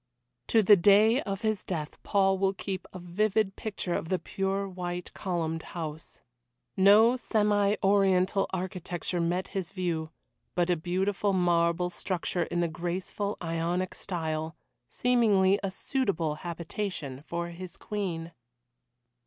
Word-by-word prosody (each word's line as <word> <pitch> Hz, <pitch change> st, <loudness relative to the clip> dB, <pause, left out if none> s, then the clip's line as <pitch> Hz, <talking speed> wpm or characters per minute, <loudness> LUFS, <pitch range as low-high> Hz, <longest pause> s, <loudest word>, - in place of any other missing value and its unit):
To 225 Hz, -2 st, +4 dB
the 205 Hz, +2 st, +8 dB
day 210 Hz, +7 st, +5 dB
of 195 Hz, -1 st, -4 dB
his 215 Hz, -3 st, 0 dB
death 155 Hz, -5 st, -5 dB
Paul 195 Hz, -2 st, +2 dB
will 195 Hz, 0 st, +1 dB
keep 190 Hz, -1 st, -5 dB
a -, -, -8 dB
vivid 195 Hz, +3 st, 0 dB
picture 195 Hz, -4 st, -3 dB
of 160 Hz, -, -2 dB
the 185 Hz, -, +2 dB
pure 195 Hz, +2 st, -2 dB
white 180 Hz, -1 st, -5 dB
columned 165 Hz, -4 st, -2 dB, 0.2 s
house. 160 Hz, -1 st, -6 dB, 0.5 s
No 210 Hz, +5 st, +6 dB
semi 210 Hz, -4 st, +2 dB
Oriental 195 Hz, -1 st, +3 dB
architecture 180 Hz, -1 st, -3 dB
met 175 Hz, +2 st, -1 dB
his 190 Hz, -2 st, -4 dB
view, 170 Hz, -5 st, -2 dB, 0.5 s
but 175 Hz, 0 st, +2 dB
a -, -, +4 dB
beautiful 190 Hz, +4 st, 0 dB
marble 175 Hz, -1 st, +2 dB
structure 175 Hz, -1 st, -2 dB
in 175 Hz, -, -1 dB
the 170 Hz, -, +2 dB
graceful 180 Hz, +5 st, -3 dB
Ionic 170 Hz, +2 st, -1 dB
style, 160 Hz, -3 st, -3 dB, 0.3 s
seeming 210 Hz, -6 st, +3 dB
a 195 Hz, -, -1 dB
suitable 190 Hz, -, -1 dB
habitation 170 Hz, -5 st, -4 dB
for 170 Hz, +2 st, -4 dB
his 175 Hz, +1 st, -8 dB
Queen. 175 Hz, -6 st, -4 dB
185 Hz, 130 wpm, -29 LUFS, 170-200 Hz, 0.5 s, the